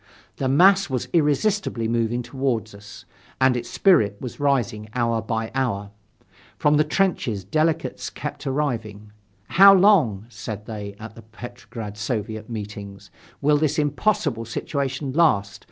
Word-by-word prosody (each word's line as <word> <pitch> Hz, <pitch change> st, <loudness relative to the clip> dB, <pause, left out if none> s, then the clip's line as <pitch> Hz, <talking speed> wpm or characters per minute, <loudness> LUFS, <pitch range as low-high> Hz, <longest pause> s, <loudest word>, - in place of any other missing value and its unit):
The 135 Hz, -, -1 dB
mass 190 Hz, +7 st, +5 dB
was 130 Hz, -3 st, -2 dB
irresistibly 155 Hz, -, +1 dB
moving 115 Hz, +1 st, 0 dB
toward 120 Hz, -4 st, -2 dB
us, 100 Hz, +1 st, -13 dB, 0.3 s
and 130 Hz, -1 st, +4 dB
its 120 Hz, -1 st, -4 dB
spirit 110 Hz, -, +3 dB
was 125 Hz, +1 st, -7 dB
rising 120 Hz, -7 st, 0 dB
hour 115 Hz, -2 st, +1 dB
by 110 Hz, 0 st, -3 dB
hour. 105 Hz, -7 st, -2 dB, 0.7 s
From 150 Hz, 0 st, +3 dB
the 150 Hz, -, +4 dB
trenches 150 Hz, -, 0 dB
delegates 155 Hz, -, -1 dB
kept -, -, -7 dB
arriving. 115 Hz, -7 st, -3 dB, 0.4 s
"How 195 Hz, +2 st, +8 dB
long," 180 Hz, -, +4 dB
said 105 Hz, -2 st, -7 dB
they, 105 Hz, -3 st, -7 dB
at 110 Hz, 0 st, -9 dB
the 115 Hz, -, -13 dB
Petrograd 115 Hz, -2 st, -9 dB
Soviet 110 Hz, -1 st, -4 dB
meetings, 100 Hz, -3 st, -8 dB, 0.3 s
"will 150 Hz, +1 st, +4 dB
this 150 Hz, -1 st, 0 dB
impossible 145 Hz, -, 0 dB
situation 135 Hz, +4 st, -3 dB
last? 100 Hz, -12 st, +2 dB
120 Hz, 135 wpm, -23 LUFS, 110-145 Hz, 0.7 s, How